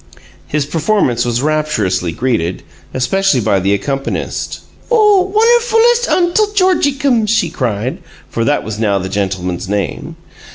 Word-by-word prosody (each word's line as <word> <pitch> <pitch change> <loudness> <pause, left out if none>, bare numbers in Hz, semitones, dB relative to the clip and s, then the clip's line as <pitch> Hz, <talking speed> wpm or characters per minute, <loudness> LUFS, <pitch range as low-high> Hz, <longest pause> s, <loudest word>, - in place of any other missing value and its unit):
His 150 -1 -1
performance 150 - 0
was 120 +1 -1
rapturously 110 - 0
greeted, 90 -4 -2 0.3
especially 135 +4 +1
by 100 -3 +1
the 95 +2 0
accompanist. 135 +7 -3 0.3
"Oh, 415 -5 +3
wunnerfulest 470 +2 +3
Untle 370 +4 +2
Georgiecums!" 285 - +2
she 180 -7 +1
cried, 120 -3 -2 0.3
for 115 - -2
that 145 +5 +1
was 110 -1 -6
now 105 -3 +1
the 95 0 -4
gentleman's 95 -2 -3
name. 100 -2 -3
140 Hz, 125 wpm, -15 LUFS, -, 0.3 s, Oh